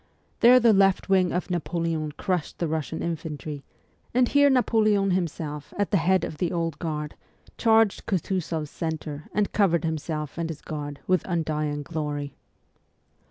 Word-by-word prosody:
There 250 Hz, +2 st, +8 dB
the 230 Hz, -2 st, +5 dB
left 195 Hz, -1 st, +3 dB
wing 185 Hz, -2 st, +3 dB
of 180 Hz, +1 st, -2 dB
Napoleon 165 Hz, -2 st, -1 dB
crushed 180 Hz, -1 st, -2 dB
the 170 Hz, -, -1 dB
Russian 160 Hz, 0 st, -3 dB
infantry, 155 Hz, -3 st, -5 dB, 0.5 s
and 250 Hz, 0 st, +4 dB
here 285 Hz, +2 st, +5 dB
Napoleon 215 Hz, -6 st, +3 dB
himself, 155 Hz, -5 st, -3 dB
at 205 Hz, -1 st, 0 dB
the 200 Hz, -, +4 dB
head 185 Hz, +2 st, +2 dB
of 150 Hz, -, -5 dB
the 175 Hz, -, 0 dB
Old 165 Hz, -4 st, -2 dB
Guard, 150 Hz, -3 st, -3 dB, 0.4 s
charged 225 Hz, -3 st, +3 dB
Kutuzoff 180 Hz, -4 st, -1 dB
s 150 Hz, -, -9 dB
centre, 155 Hz, -2 st, -4 dB
and 210 Hz, 0 st, 0 dB
covered 175 Hz, -6 st, +3 dB
himself 155 Hz, -1 st, -3 dB
and 165 Hz, -1 st, -2 dB
his 155 Hz, -2 st, -7 dB
Guard 145 Hz, -2 st, -6 dB
with 185 Hz, -2 st, +2 dB
undying 155 Hz, -4 st, -1 dB
glory. 145 Hz, -3 st, -4 dB
165 Hz, 155 wpm, -26 LUFS, 150-190 Hz, 0.5 s, There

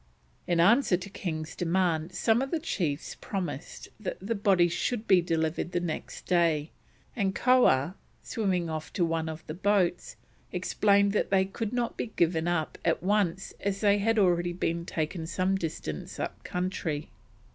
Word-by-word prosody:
In 175 Hz, -1 st, +2 dB
answer 205 Hz, +2 st, +5 dB
to 190 Hz, +2 st, -9 dB
King's 160 Hz, -5 st, -4 dB
demand 170 Hz, -2 st, 0 dB
some 225 Hz, +5 st, +3 dB
of 270 Hz, -, -2 dB
the 330 Hz, -, 0 dB
chiefs 170 Hz, -, -2 dB
promised 180 Hz, -8 st, -5 dB
that 215 Hz, -, -4 dB
the 200 Hz, +5 st, -2 dB
bodies 190 Hz, -5 st, +3 dB
should 235 Hz, -3 st, -1 dB
be 185 Hz, -2 st, +6 dB
delivered 165 Hz, 0 st, -1 dB
the 175 Hz, -, +2 dB
next 175 Hz, -3 st, -5 dB
day, 165 Hz, -4 st, +2 dB, 0.4 s
and 195 Hz, -4 st, 0 dB
Koah, 210 Hz, -, +4 dB, 0.3 s
swimming 190 Hz, -7 st, -1 dB
off 155 Hz, -1 st, -5 dB
to 175 Hz, -, +2 dB
one 165 Hz, -1 st, -1 dB
of 160 Hz, 0 st, -7 dB
the 155 Hz, -, -5 dB
boats, 185 Hz, -1 st, +1 dB, 0.4 s
explained 200 Hz, +2 st, +3 dB
that -, -, +1 dB
they 190 Hz, -1 st, +3 dB
could 205 Hz, +3 st, -4 dB
not 245 Hz, -1 st, -1 dB
be -, -, -2 dB
given 165 Hz, -1 st, +2 dB
up 175 Hz, -3 st, -1 dB
at 165 Hz, 0 st, +1 dB
once 195 Hz, -2 st, 0 dB
as 200 Hz, 0 st, -2 dB
they 205 Hz, -1 st, +4 dB
had 225 Hz, +2 st, +2 dB
already 175 Hz, -3 st, +3 dB
been 170 Hz, -1 st, -2 dB
taken 160 Hz, +1 st, -3 dB
some 185 Hz, +3 st, +1 dB
distance 155 Hz, -, -5 dB
up -, -, -4 dB
country. 180 Hz, -4 st, -3 dB
180 Hz, 165 wpm, -28 LUFS, 165-200 Hz, 0.4 s, be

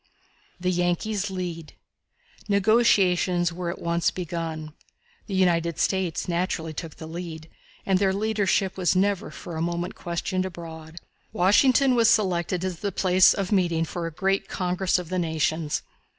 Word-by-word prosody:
The 180 Hz, +1 st, 0 dB
Yankees 185 Hz, +4 st, 0 dB
Lead. 175 Hz, -4 st, -5 dB, 0.7 s
Negotiations 190 Hz, -4 st, +3 dB
were 175 Hz, 0 st, -4 dB
at 170 Hz, -, -4 dB
once 170 Hz, 0 st, +1 dB
begun. 165 Hz, -3 st, -5 dB, 0.5 s
The 195 Hz, -, -3 dB
United 170 Hz, -3 st, +2 dB
States 190 Hz, -3 st, 0 dB
naturally 170 Hz, -2 st, -2 dB
took 160 Hz, 0 st, -7 dB
the 160 Hz, -, -9 dB
lead, 160 Hz, -1 st, -7 dB, 0.4 s
and 190 Hz, -1 st, +2 dB
their 195 Hz, -1 st, +3 dB
leadership 200 Hz, -2 st, 0 dB
was 185 Hz, -1 st, +2 dB
never 195 Hz, 0 st, +1 dB
for 170 Hz, -3 st, -8 dB
a -, -, -2 dB
moment 170 Hz, +2 st, -2 dB
questioned 180 Hz, +1 st, -2 dB
abroad. 165 Hz, -2 st, -9 dB, 0.3 s
Washington 255 Hz, +8 st, +4 dB
was 230 Hz, -2 st, +4 dB
selected 185 Hz, -4 st, +1 dB
as 180 Hz, -3 st, -4 dB
the 200 Hz, -, -2 dB
place 185 Hz, 0 st, +4 dB
of 195 Hz, -1 st, -3 dB
meeting 170 Hz, -5 st, +2 dB
for 170 Hz, +1 st, -4 dB
a -, -, -5 dB
great 195 Hz, +5 st, 0 dB
congress 185 Hz, 0 st, 0 dB
of 180 Hz, -3 st, -5 dB
the 185 Hz, 0 st, -1 dB
nations. 160 Hz, -2 st, -1 dB
180 Hz, 150 wpm, -25 LUFS, 170-190 Hz, 0.7 s, Washington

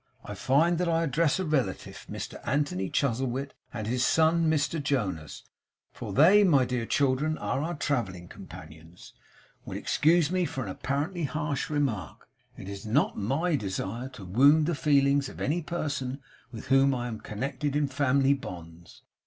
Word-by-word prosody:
I 105 Hz, -, -6 dB
find 155 Hz, -, +2 dB
that 180 Hz, -1 st, 0 dB
I 165 Hz, 0 st, +2 dB
address 155 Hz, +1 st, +1 dB
a 190 Hz, -, -1 dB
relative, 135 Hz, -11 st, -2 dB
Mr -, -, -6 dB
Anthony 120 Hz, -8 st, -1 dB
Chuzzlewit 135 Hz, +1 st, -1 dB, 0.2 s
and 110 Hz, -3 st, -5 dB
his 125 Hz, +3 st, 0 dB
son 160 Hz, +4 st, +3 dB
Mr 155 Hz, 0 st, 0 dB
Jonas 100 Hz, -, -2 dB, 0.5 s
for -, -, -7 dB
they, 185 Hz, +9 st, +6 dB
my 145 Hz, -9 st, +4 dB
dear 125 Hz, -2 st, -2 dB
children, 145 Hz, +3 st, +1 dB
are 105 Hz, +6 st, -2 dB
our 170 Hz, +3 st, -3 dB
travelling 105 Hz, -13 st, -2 dB
companions 80 Hz, +2 st, -13 dB, 0.5 s
will -, -, -6 dB
excuse 165 Hz, +1 st, +2 dB
me 185 Hz, -1 st, +1 dB
for 145 Hz, -4 st, -4 dB
an 105 Hz, -, -6 dB
apparently 150 Hz, -, -2 dB
harsh 145 Hz, +1 st, -3 dB
remark. 130 Hz, -, -2 dB, 0.3 s
It -, -, -9 dB
is 100 Hz, 0 st, -7 dB
not 115 Hz, +8 st, +1 dB
MY 150 Hz, -, 0 dB
desire 105 Hz, +4 st, -4 dB
to 100 Hz, -, -9 dB
wound 140 Hz, -, +5 dB
the 170 Hz, -, 0 dB
feelings 140 Hz, -2 st, +2 dB
of -, -, -12 dB
any 160 Hz, +6 st, 0 dB
person 140 Hz, -5 st, -3 dB, 0.3 s
with 115 Hz, -, -9 dB
whom 135 Hz, 0 st, +4 dB
I 120 Hz, -1 st, -3 dB
am 110 Hz, -3 st, -6 dB
connected 135 Hz, +6 st, -3 dB
in 150 Hz, -1 st, +2 dB
family 140 Hz, 0 st, +2 dB
bonds. 85 Hz, -9 st, -9 dB
140 Hz, 160 wpm, -28 LUFS, 115-155 Hz, 0.5 s, they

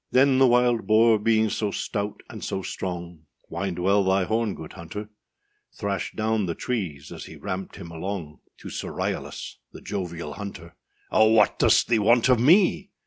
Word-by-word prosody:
Then 130 Hz, 0 st, +4 dB
the 135 Hz, -, +6 dB
wild 120 Hz, -1 st, +2 dB
boar, 110 Hz, 0 st, +5 dB
being 110 Hz, 0 st, +2 dB
so 105 Hz, -, -1 dB
stout 100 Hz, 0 st, -4 dB
and -, -, -9 dB
so 95 Hz, -, -3 dB
strong, 85 Hz, -4 st, -6 dB, 0.2 s
Wind 85 Hz, +1 st, -3 dB
well 100 Hz, +3 st, +3 dB
thy 95 Hz, 0 st, +2 dB
horn, 110 Hz, +1 st, -1 dB
good 80 Hz, -, -9 dB
hunter; 105 Hz, +5 st, -8 dB, 0.6 s
Thrashed 100 Hz, -3 st, -3 dB
down 110 Hz, -2 st, 0 dB
the 85 Hz, -, -2 dB
trees 85 Hz, -, -4 dB
as -, -, -8 dB
he -, -, -11 dB
ramped 95 Hz, +1 st, -5 dB
him 85 Hz, -4 st, -9 dB
along, 85 Hz, -2 st, -5 dB, 0.2 s
To -, -, -8 dB
Sir -, -, -5 dB
Ryalas, -, -, -4 dB, 0.2 s
the -, -, -9 dB
jovial 85 Hz, -6 st, -5 dB
hunter. 100 Hz, -3 st, -8 dB, 0.4 s
âOh, 110 Hz, +1 st, +5 dB
what 105 Hz, -2 st, +4 dB
dost -, -, +4 dB
thee 115 Hz, -2 st, +3 dB
want 115 Hz, +4 st, +4 dB
of 125 Hz, -2 st, +5 dB
me? 185 Hz, -, +4 dB
100 Hz, 175 wpm, -25 LUFS, 90-115 Hz, 0.6 s, the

